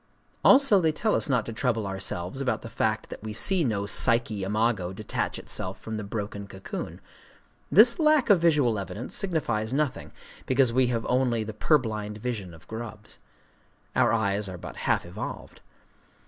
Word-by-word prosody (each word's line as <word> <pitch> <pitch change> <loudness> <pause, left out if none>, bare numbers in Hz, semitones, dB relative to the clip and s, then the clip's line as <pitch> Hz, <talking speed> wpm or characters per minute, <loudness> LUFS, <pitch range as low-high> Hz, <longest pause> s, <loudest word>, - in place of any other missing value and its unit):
Also 265 -8 +6
they 160 -2 +3
tell 215 +8 0
us - - 0
not 125 -5 +1
to 115 - -6
trouble 115 -2 0
ourselves 95 +3 -3
about 125 -5 -1
the 115 - -8
fact 110 0 -1
that - - -8
we 110 0 -6
see 175 - +2
no 105 -7 0
Psyché 110 0 +1
imago 105 -2 0
detach 105 +2 -3
itself 95 +1 -3
from 110 -1 -5
the 105 - -4
broken 100 -1 -5
cocoon: 95 -1 -7 0.7
this 235 - +7
lack 305 -6 +4
of 195 - +6
visual 145 -10 +3
evidence 100 +5 -6
signifies 120 - 0
nothing, 145 -1 -1 0.4
because 130 -2 +3
we 130 0 +3
have 115 -2 -2
only 125 -3 +1
the 110 0 -6
purblind 110 -4 0
vision 110 -5 -4
of 80 - -18
grubs. 110 -2 -8 0.8
Our - - +4
eyes 100 -2 0
are 90 - -7
but - - -9
half - - 0
evolved. 90 +5 -7
110 Hz, 165 wpm, -26 LUFS, 105-130 Hz, 0.8 s, this